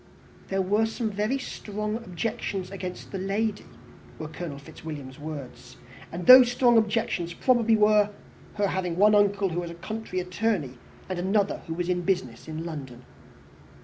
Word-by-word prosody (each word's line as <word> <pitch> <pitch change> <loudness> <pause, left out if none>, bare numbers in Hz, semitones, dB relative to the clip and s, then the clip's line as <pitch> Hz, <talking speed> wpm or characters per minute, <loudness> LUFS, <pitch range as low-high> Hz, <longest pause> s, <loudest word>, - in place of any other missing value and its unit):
"There 195 0 0
were 210 +4 +2
some 225 -1 -3
very 210 +6 0
strong 210 -4 -4
objections 200 -2 -4
against 185 -2 -7
the 195 - -4
lady," 205 +2 -1 0.5
were 155 - -5
Colonel 155 -2 -6
Fitzwilliam's 140 -1 -9
words; 140 -4 -8 0.3
and 175 +1 -5
these 255 -1 +10
strong 245 -1 +4
objections 215 -6 +1
probably 235 -3 +3
were, 210 -1 +4 0.5
her 205 -1 +1
having 180 -2 -2
one 210 +2 +6
uncle 200 -1 +3
who 175 +1 -2
was 175 -1 -4
a 170 - -8
country 215 +2 -5
attorney, 180 - -1 0.3
and 185 -1 -3
another 195 +2 +1
who 165 - -3
was 175 0 -2
in 180 -1 0
business 170 -12 -2
in 160 +1 -5
London. 135 -7 -7
190 Hz, 155 wpm, -26 LUFS, 170-215 Hz, 0.5 s, these